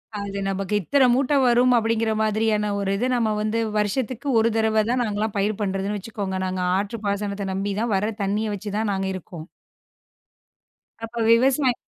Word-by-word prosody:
அது 200 -1 -5
நமக்கு 195 +1 -3
இத்தனை 270 - +3
மூட்டை 270 +3 +1
வரும் 245 +1 +4
அப்பிடிங்கிற 225 0 +1
மாதிரியான 215 -1 +1
ஒரு 195 -1 -1
இது 245 +5 0
நம்ம 220 -3 +1
வந்து 215 +2 -1 0.2
வருஷத்துக்கு 235 +5 -2
ஒரு 230 +1 +3
தடவை 220 -1 +2
தான் 250 0 +1
நாங்கல்லாம் 215 0 -2
பயிர் 205 +1 0
பண்றதுன்னு 195 +1 -1
வச்சுக்கோங்க. 200 -2 -4
நாங்க 185 0 -2 0.2
ஆற்று 205 +3 -3
பாசனத்த 200 -1 -2
நம்பி 195 +1 -2
தான், 230 -3 0
வர 210 +3 0
தண்ணிய 210 +2 -1
வச்சுதான் 210 +2 -2
நாங்க 190 0 -2
இருக்கோம். 175 -3 -8 1.6
அப்ப 225 +1 -7 0.2
விவசாய 255 +2 +4
210 Hz, 155 wpm, -23 LUFS, 200-230 Hz, 1.6 s, வரும்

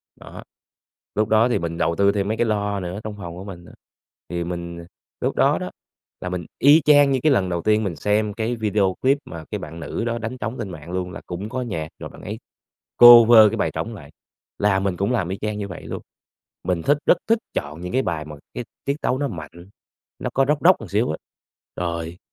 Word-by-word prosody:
đó, - - -11 0.7
lúc 110 +1 +1
đó 110 +3 +4
thì - - +1
mình 85 0 -4
đầu 85 - +1
tư 100 +2 +4
thêm 100 -1 -1
mấy 110 +2 -1
cái 120 - +2
loa 105 -2 -1
nữa 90 +2 -5
trong 105 -1 -6
phòng 85 -4 -7
của 90 - -8
mình 90 -3 -9
á, - - -14 0.6
thì 85 -1 -2
mình 85 -1 -6 0.4
lúc - - -1
đó - - +3
đó, - - -5 0.5
là 90 - -4
mình 90 -1 -4
y 145 +4 +7
chang 145 -2 +6
như 130 - +2
cái 155 - +4
lần 95 -8 +2
đầu 85 -1 -2
tiên 110 +2 +2
mình 95 -5 -2
xem 105 +6 0
cái 115 +2 -2
video 105 -4 +1
clip 135 +2 +3
mà 85 -2 -8
cái - - -2
bạn 80 +2 -8
nữ 100 +7 -4
đó 120 0 -1
đánh 115 +3 -5
trống 120 0 -4
trên 110 -4 -4
mạng 85 -1 -9
luôn. 90 0 -3
Là - - -8
cũng 95 +4 -5
có 130 +1 -3
nhạc 80 -10 -3
rồi - - -7
bạn - - -14
ấy - - -6 0.6
cover 120 -1 +10
cái 115 - -3
bài - - 0
trống - - -4
lại, - - -12 0.5
là 100 -2 +3
mình 95 -2 -1
cũng 100 +6 0
làm 100 -8 0
y 95 - -3
chang 105 -1 -2
như 100 -1 -4
vậy 90 - -9
luôn. - - -6 0.6
Mình 90 -2 -1
thích 145 - +3
rất - - +5
thích 225 0 +3
chọn 75 +3 -4
những 90 +3 -6
cái 130 - +3
bài 80 -9 -3
mà 75 -1 -9 0.2
cái 125 - -4 0.2
tiết 140 - 0
tấu 125 - +1
nó 145 +1 -1
mạnh, 85 - -9 0.5
nó - - -3
có 135 - +3
Rock 150 0 +2
Rock 185 -5 +6
một 110 - -9
xíu 105 +4 +1
á, 80 - -4 0.6
rồi 85 0 -4
100 Hz, 240 wpm, -22 LUFS, 85-115 Hz, 0.7 s, cover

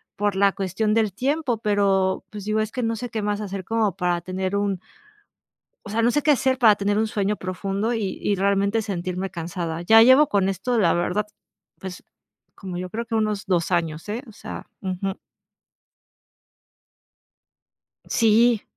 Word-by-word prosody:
por 205 -1 0
la 200 +1 +4
cuestión 200 +3 -1
del 220 -3 +1
tiempo, 270 - 0
pero, 195 -3 +1
pues, 210 -2 -7
digo, 215 +1 0
es 215 0 -3
que 250 0 -3
no 225 0 0
sé 245 +2 -5
qué 220 -2 -3
más 205 0 -1
hacer 195 -2 -5
como 220 -4 0
para 175 -2 0
tener 185 +2 -3
un 200 -2 -1 1.1
o - - -7
sea, 220 +2 0
no 235 - +4
sé 295 - +1
qué 300 - +3
hacer 265 -1 +2
para 220 -5 +6
tener 205 +1 0
un 220 0 +1
sueño 210 0 -1
profundo 195 +4 -2
y 215 -5 -2
y 205 - +1
realmente 200 +3 +1
sentirme 185 -1 -3
cansada. 170 -1 -4
Ya 225 +6 +7
llevo 260 +5 +7
con 195 -2 +1
esto, 195 +6 -1
la 175 -6 +4
verdad, 180 +4 0 0.5
pues, 190 -1 -8 0.5
como 185 -2 -7
yo 180 0 -4
creo 225 +5 -4
que 230 0 -5
unos 215 -2 -1
2 175 -3 0
años, 165 0 -1
¿eh?, 225 +4 -3
o - - -11
sea, - - -8
ujú. 190 0 -3 2.9
Sí. 230 0 +4
205 Hz, 175 wpm, -23 LUFS, 190-225 Hz, 2.9 s, Ya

